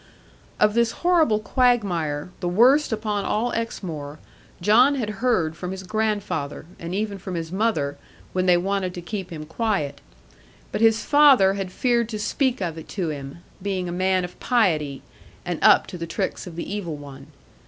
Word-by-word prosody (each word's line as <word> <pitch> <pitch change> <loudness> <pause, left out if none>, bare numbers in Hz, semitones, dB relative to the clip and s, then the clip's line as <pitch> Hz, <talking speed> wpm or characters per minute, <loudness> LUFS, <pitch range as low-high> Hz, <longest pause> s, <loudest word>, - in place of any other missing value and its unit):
Of 210 0 +4
this 235 0 +2
horrible 325 -11 +4
quagmire, 200 - +1
the 180 - -2
worst 255 +11 +4
upon 210 -2 -1
all 230 +5 0
Exmoor, 160 -10 -4 0.4
John 240 +10 +5
had 215 -6 -4
heard 185 -11 +1
from 180 - -6
his 190 0 -6
grandfather, 205 -9 -2
and 170 +2 -5
even 205 -1 -2
from 185 -1 -6
his 165 -1 -4
mother, 180 -9 0 0.3
when 185 0 0
they 175 -1 +6
wanted 190 0 -1
to 175 - -6
keep 190 0 -5
him 155 -2 -7
quiet; 165 -5 -2 0.7
but - - -2
his 225 -1 +4
father 275 -10 +6
had 195 -2 -4
feared 235 +1 +1
to 215 - -4
speak 250 +3 0
of 165 -3 -3
it 160 - -11
to 180 -5 -3
him, 140 +3 -7 0.2
being 190 -2 -2
a - - -4
man 185 +1 +1
of 180 - -12
piety, 155 - +1 0.4
and - - -3
up - - +6
to 180 - -8
the 170 - -4
tricks 190 +2 -3
of 170 - -9
the 170 - -5
evil 175 -7 -4
one. 140 -1 -11
190 Hz, 175 wpm, -23 LUFS, 170-220 Hz, 0.7 s, they